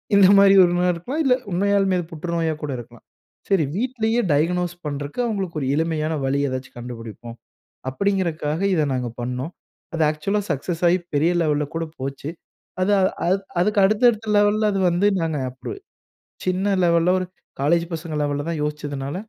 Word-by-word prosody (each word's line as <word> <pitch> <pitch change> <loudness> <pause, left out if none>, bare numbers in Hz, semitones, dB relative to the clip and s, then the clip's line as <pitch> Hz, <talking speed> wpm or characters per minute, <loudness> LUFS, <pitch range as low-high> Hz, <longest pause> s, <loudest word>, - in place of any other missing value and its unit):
இந்த 195 -2 +7
மாதிரி 195 0 +7
ஒண்ணா 175 +1 +1
இருக்கலாம். 255 - -3
இல்ல 260 -2 +4 0.2
உண்மையாலுமே 195 0 +2
அது 170 - -4
புற்றுநோயா 165 0 -1
கூட 145 - -3
இருக்கலாம். 120 0 -12 0.4
சரி 190 -5 +3
வீட்லயே 235 0 0
டயக்னோஸ் 175 +4 +1
பண்றதுக்கு 145 - -5
அவுங்களுக்கு 195 -7 -3
ஒரு 130 - -1
எளிமையான 160 0 0
வழி 140 +1 +1
ஏதாச்சும் 130 -1 -6
கண்டுபிடிப்போம். 115 -1 -8 0.5
அப்டிங்கறக்காக, 170 -2 -1
இத 155 - +2
நாங்க 125 -1 -2
பண்ணோம். 125 +7 -4 0.4
அது 165 - 0
ஆக்சுவலா 195 +7 -1
சக்சஸ் 165 +4 -2
ஆயி 180 +2 +3 0.2
பெரிய 155 +4 +3
லெவல 150 -1 +1
கூட 165 0 -1 0.2
போச்சு. 140 +2 -5 0.5
அது 205 +2 +2 0.3
அது 190 +2 +3 0.2
அதுக்கு 205 +2 +2
அடுத்த 215 +4 +2
அடுத்த 220 -1 -7
லெவல்ல 210 +1 +3
அது 195 - 0
வந்து 175 +4 +2
நாங்க 160 -3 -1
அப்ப 130 - -7 0.7
சின்ன 190 +2 +1
லெவல்ல 170 +1 +3
ஒரு 185 - -2 0.4
காலேஜ் 170 +4 +2
பசங்க 160 -1 -5
லெவல்ல 145 +1 -2
தான் 160 -3 -2
யோசிச்சதுனால, 145 -1 -4
170 Hz, 155 wpm, -22 LUFS, 145-195 Hz, 0.7 s, இந்த